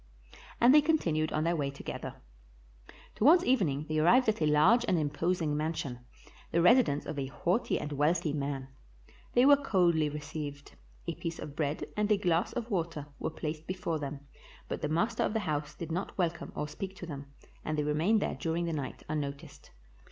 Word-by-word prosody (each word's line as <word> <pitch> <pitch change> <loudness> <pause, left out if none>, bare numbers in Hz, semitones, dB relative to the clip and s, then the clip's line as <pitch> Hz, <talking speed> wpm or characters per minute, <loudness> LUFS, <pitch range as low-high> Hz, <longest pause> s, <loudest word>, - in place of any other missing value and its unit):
And 240 +3 +7
they 300 - +8
continued 170 - +1
on 155 - 0
their 170 +1 +1
way 145 -3 -1
together. 140 - -6 1.0
Towards 330 +10 +5
evening 160 - +1
they 155 0 0
arrived 235 +11 +5
at 215 - -1
a 155 - +3
large 180 +11 +5
and 180 - +2
imposing 155 +1 0
mansion, 150 -5 -3 0.5
the 170 - +2
residence 180 - +4
of 150 -1 -4
a 135 - -2
haughty 180 - 0
and 150 - -5
wealthy 150 +2 +1
man. 140 -2 -3 0.6
They 245 +1 +5
were 285 +1 +8
coldly 175 - +2
received; 145 -1 -6 0.3
a - - -2
piece 165 0 -5
of 145 - -8
bread 150 -1 -1
and 210 0 0
a 210 - +5
glass 175 -3 +1
of 240 -1 -4
water 165 -5 -2
were - - -2
placed 155 0 -5
before 180 -3 -2
them, 140 -1 -5 0.5
but - - -4
the 150 - -1
master 175 +9 0
of - - +1
the 220 - 0
house 150 -3 -3
did 165 -1 -6
not 180 +4 -3
welcome 170 -3 -1
or 150 - -2
speak 190 +5 -6
to 180 - -8
them, 140 -4 -7 0.4
and 155 0 -2
they 150 - +1
re 150 0 0
mained 195 +8 +2
there - - -1
during 165 +1 -2
the 165 - -2
night 140 -4 -5
unnoticed. 145 -2 -5
160 Hz, 190 wpm, -31 LUFS, 150-190 Hz, 1.0 s, they